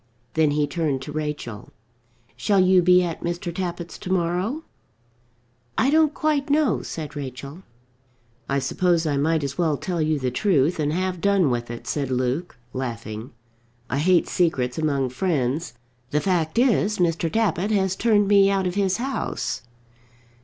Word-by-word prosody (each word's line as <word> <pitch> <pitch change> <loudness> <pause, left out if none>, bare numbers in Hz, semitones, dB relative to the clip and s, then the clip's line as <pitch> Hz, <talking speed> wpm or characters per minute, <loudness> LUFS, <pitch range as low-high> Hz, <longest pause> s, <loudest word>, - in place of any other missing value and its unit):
Then 160 -1 +3
he 145 0 +1
turned 145 -3 -2
to 150 - -7
Rachel. 150 -8 -5 0.7
"Shall 200 -2 +2
you 185 0 +5
be 180 +1 +5
at 170 -2 -4
Mr. 175 0 -3
Tappitt's 175 -1 -5
to 185 - -6
morrow?" 185 - 0 1.1
"I 270 - +3
don't 310 -1 +3
quite 300 -2 0
know," 290 -4 +2
said 150 -2 -6
Rachel. 140 +3 -7 0.9
"I 140 - +1
suppose 170 +4 +1
I 145 -2 0
might 155 +2 +1
as 140 +3 -4
well 160 -4 +2
tell 175 0 -2
you 155 0 +1
the 130 -2 -2
truth 165 - +2
and 150 -1 +1
have 180 +1 -2
done 195 -8 +3
with 120 -1 -2
it," 120 0 -7
said 135 0 -2
Luke, 130 +7 -1 0.2
laughing. 115 -2 -5 0.6
"I 135 - 0
hate 175 +3 +3
secrets 135 -8 0
among 140 -4 0
friends. 140 0 -1 0.3
The 150 - +1
fact 170 -2 0
is 225 -4 +3
Mr. 165 -2 +1
Tappitt 210 -3 +1
has 190 -3 +1
turned 205 -1 +3
me 200 -1 +5
out 195 -1 +1
of 180 - -1
his 195 -1 +1
house." 265 +3 -3
170 Hz, 160 wpm, -23 LUFS, 140-190 Hz, 1.1 s, you